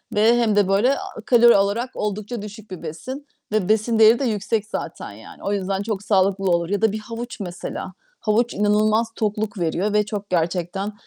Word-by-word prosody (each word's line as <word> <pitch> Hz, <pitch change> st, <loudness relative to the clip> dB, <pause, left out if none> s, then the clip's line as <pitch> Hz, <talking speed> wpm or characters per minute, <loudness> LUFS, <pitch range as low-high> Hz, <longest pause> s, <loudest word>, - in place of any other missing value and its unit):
ve 225 Hz, +3 st, +5 dB
hem 225 Hz, -3 st, +2 dB
de 205 Hz, -2 st, +4 dB
böyle 230 Hz, +8 st, +3 dB
a 220 Hz, -, -8 dB
kalori 240 Hz, -3 st, +6 dB
olarak 205 Hz, +6 st, 0 dB
oldukça 210 Hz, +2 st, -3 dB
düşük 210 Hz, -1 st, -10 dB
bir 185 Hz, -, -7 dB
besin 210 Hz, -, -7 dB, 0.3 s
ve 210 Hz, -3 st, 0 dB
besin 220 Hz, +1 st, +2 dB
değeri 220 Hz, +2 st, +7 dB
de 275 Hz, -, 0 dB
yüksek 215 Hz, -1 st, -1 dB
zaten. -, -, -6 dB
Yani, -, -, -13 dB
o 200 Hz, -, -1 dB
yüzden 195 Hz, 0 st, -1 dB
çok 205 Hz, -2 st, -3 dB
sağlıklı 195 Hz, -1 st, +2 dB
olur. 170 Hz, 0 st, +1 dB
Ya 205 Hz, +2 st, -1 dB
da 220 Hz, -2 st, +3 dB
bir 215 Hz, -, -4 dB
havuç 230 Hz, +2 st, -7 dB
mesela. 185 Hz, 0 st, -6 dB, 0.3 s
Havuç 230 Hz, +2 st, +1 dB
inanılmaz 215 Hz, +2 st, +2 dB
tokluk 210 Hz, -1 st, -2 dB
veriyor 180 Hz, +5 st, 0 dB
ve 210 Hz, -1 st, +3 dB
çok, 205 Hz, -1 st, -5 dB
gerçekten 180 Hz, +4 st, -1 dB
210 Hz, 190 wpm, -22 LUFS, 195-225 Hz, 0.3 s, değeri